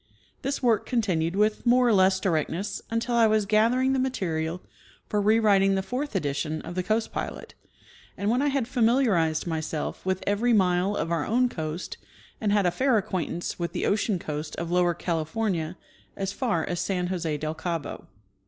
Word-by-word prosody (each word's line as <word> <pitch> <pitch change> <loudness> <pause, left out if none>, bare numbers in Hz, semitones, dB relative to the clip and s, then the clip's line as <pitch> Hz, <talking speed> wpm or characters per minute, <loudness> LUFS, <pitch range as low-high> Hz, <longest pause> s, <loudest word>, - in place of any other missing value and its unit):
This 275 0 -3
work 230 -4 +2
continued 185 -9 0
with 210 +1 +1
more 245 +1 +4
or 235 - +4
less 190 -1 +4
directness 190 +3 -1
until 230 +2 -1
I 230 -1 +5
was 215 -1 +2
gathering 235 +6 +3
the 265 - +1
material 175 -9 -2 0.4
for 210 - 0
rewriting 200 -2 +4
the 190 - -1
fourth 255 +4 -4
edition 155 -1 -1
of - - -7
the 185 - -1
Coast 215 +5 -1
Pilot, - - -5
'^ - - -39 0.5
and 200 - -2
when 250 +3 +2
I 290 - +2
had 275 -4 0
familiarized 225 - +2
myself 160 -2 -3
with 190 0 -1
every 220 +4 +2
mile 185 0 +2
of 165 - -2
our 165 -3 0
own 250 +3 +2
coast 160 -2 -5 0.4
and 210 -2 +1
had 205 -2 +3
a 175 - +3
fair 255 +5 +2
acquaintance 180 -4 -3
with 170 0 -3
the - - -1
ocean 205 -1 +1
coast 150 -2 -5
of 170 0 -4
Lower 175 -1 +2
Cali 165 -2 -1
fornia 175 -2 -2 0.4
as 195 0 -2
far 205 - 0
as 175 -1 -3
San 180 -2 -1
Jose 170 -4 -2
del 155 +1 -3
Cabo. 165 -1 -4
195 Hz, 185 wpm, -26 LUFS, 170-225 Hz, 0.5 s, I